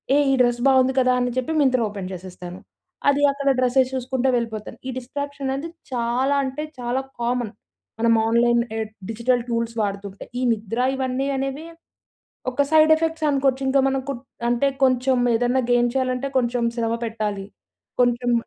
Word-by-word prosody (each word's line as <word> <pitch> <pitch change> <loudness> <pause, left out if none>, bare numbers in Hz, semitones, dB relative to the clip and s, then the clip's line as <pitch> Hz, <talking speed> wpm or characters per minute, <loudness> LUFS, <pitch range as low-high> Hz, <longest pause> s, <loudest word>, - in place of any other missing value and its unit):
ఏహ్! 290 0 +4
ఈ - - +3
డ్రెస్ 240 -1 +2
బాగుంది 260 0 +4
కదా! 255 0 +3
అని 245 0 0
చెప్పి 255 +5 -1
మింత్రా 255 -3 +3
ఓపెన్ 195 -2 -6
చేసేస్తాను. 180 0 -9 0.5
అది 285 0 +2
అక్కడ 280 0 -1
డ్రెస్సెస్ 255 +1 +2
చూసుకుంటా 260 0 -1
వెళ్ళిపోతాను. 225 -3 -4
ఈ - - -2
డిస్ట్రాక్షన్ 280 +2 -5
అనేది 275 +4 -4 0.2
చాలా 250 +3 0
అంటే, 265 +3 -3 0.2
చాలా 245 +2 -1 0.2
కామన్. 240 -2 -1 0.5
మనం 230 0 +4
ఆన్లైన్ 235 +1 +3 0.2
ఎహ్ 220 -1 -3 0.2
డిజిటల్ 240 +2 +1
టూల్స్ 230 0 -1
వాడుతుంటే, 200 -1 -4
ఈ - - -2
నిద్ర 225 +1 -3 0.2
ఇవన్నీ 265 0 -1
అనేవి 270 +3 -3 0.9
ఒక 285 +3 +2
సైడ్ 315 0 +6
ఎఫెక్ట్స్ 320 0 -1
అనుకోవచ్చు. 270 -1 +1
ఇంకా 275 +1 +3
మనకు 270 +1 -2 0.4
అంటే, 240 +3 +2 0.2
కొంచెం 255 0 +3 0.2
ఏదన్నా 245 +3 +2
గెయిన్ 240 0 +3
చేయాలంటే 260 0 -1
కొంచెం 240 -1 0
శ్రమ 230 -1 0
పెట్టాలి. 210 -3 -3 0.6
కొంచెం 245 0 +2
250 Hz, 155 wpm, -23 LUFS, 235-270 Hz, 0.9 s, సైడ్